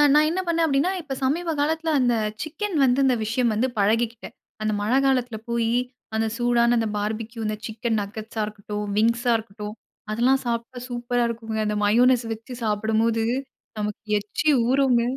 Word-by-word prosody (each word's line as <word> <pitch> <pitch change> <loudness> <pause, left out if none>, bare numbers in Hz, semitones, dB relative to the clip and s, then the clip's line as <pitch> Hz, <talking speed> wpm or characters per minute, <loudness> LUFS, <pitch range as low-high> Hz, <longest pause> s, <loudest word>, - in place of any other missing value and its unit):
நான் 305 0 +5
என்ன 370 +3 -1
பண்ணேன் 335 -1 +2
அப்படின்னா, 290 +5 +2
இப்ப 275 -4 -5
சமீப 325 +5 0
காலத்தில 320 +2 0
அந்த 245 -1 +3 0.3
சிக்கன் 340 +5 -3
வந்து 255 +1 +3
இந்த 255 -2 +4
விஷயம் 230 +1 +1
வந்து 235 +5 +1
பழகிக்கிட்டேன். 230 +3 0 0.3
அந்த 215 0 0
மழை 235 +6 +2
காலத்தில 250 -4 +1
போயி 235 0 +1 0.4
அந்த 220 0 +1
சூடான 240 0 +3
அந்த 225 -1 +1
பார்பிக்யூ 220 +2 -3
அந்த 215 0 -2
சிக்கன் 225 0 -1
நகெட்ஸா 220 +2 -5
இருக்கட்டும், 210 0 -5
விங்ஸா 235 +2 +2
இருக்கட்டும். 210 0 -8 0.4
அதெல்லாம் 255 +4 +3
சாப்பிட்டா 235 +2 -3
சூப்பரா 240 0 -1
இருக்குங்க. 225 -1 -4
அந்த 210 0 0
மயோனஸ் 240 +3 +4
வச்சு 230 +3 -10
சாப்பிடும்போது 220 +1 +1 0.5
நமக்கு 210 0 -3 0.2
எச்சி 210 +9 -1 0.2
ஊறுங்க. 260 -3 +3
235 Hz, 155 wpm, -24 LUFS, 220-260 Hz, 0.5 s, நான்